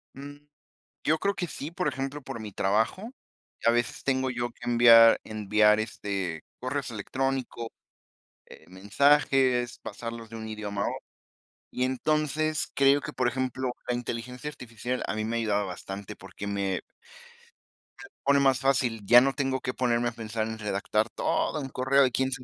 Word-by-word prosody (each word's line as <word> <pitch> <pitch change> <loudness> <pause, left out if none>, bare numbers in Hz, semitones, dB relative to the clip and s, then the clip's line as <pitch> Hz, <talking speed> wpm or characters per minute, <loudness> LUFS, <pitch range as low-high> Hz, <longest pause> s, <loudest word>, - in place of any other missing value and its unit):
Mm. 145 +1 -9 0.7
Yo 155 +1 +2
creo 200 0 0
que 180 - -3
sí, 150 -2 -6
por 180 +1 -2
ejemplo, 135 +2 -3
por 115 - -7
mi 105 -2 -7
trabajo, 110 - 0 0.5
a 115 - +6
veces 120 0 -1
tengo 130 -1 +1
yo 120 -1 -2
que 120 +1 -8
enviar 115 -1 +8
enviar, 105 0 +3
este, 100 -6 -4 0.2
correo 130 +3 -2
electrónicos, 125 +1 -3 0.8
eh, - - -15
mensajes, 125 +4 +2
pasarlos 115 +1 -7
de 115 - -9
un 110 - -6
idioma 105 -2 -4
a - - 0
otro. - - -7 0.7
Y 125 - -1
entonces, 155 +3 0
creo 140 +1 +4
que, 150 - -7
por 130 - +1
ejemplo, 130 0 -2 0.2
la 125 - +1
inteligencia 125 +3 -5
artificial 125 -2 -5
a - - -2
mí 110 0 -2
me 115 +1 -2
ha - - +1
ayudado 105 -2 0
bastante 95 +2 -7
porque 95 +1 -9
me 100 -2 -1 1.2
me - - -11
lo - - -66
pone 140 0 +4
más 135 -2 +3
fácil. 130 -5 +1
Ya 120 +4 +8
no 135 +1 +2
tengo 135 -2 -1
que 125 - -3
ponerme 120 -2 +1
a - - -9
pensar 110 -1 -3
en 110 0 -6
redactar 105 +2 -1
todo 155 - -1
un 135 -2 -5
correo 130 +1 +3
quien 130 +2 0
sa 130 -1 -4
120 Hz, 170 wpm, -27 LUFS, 110-135 Hz, 1.2 s, enviar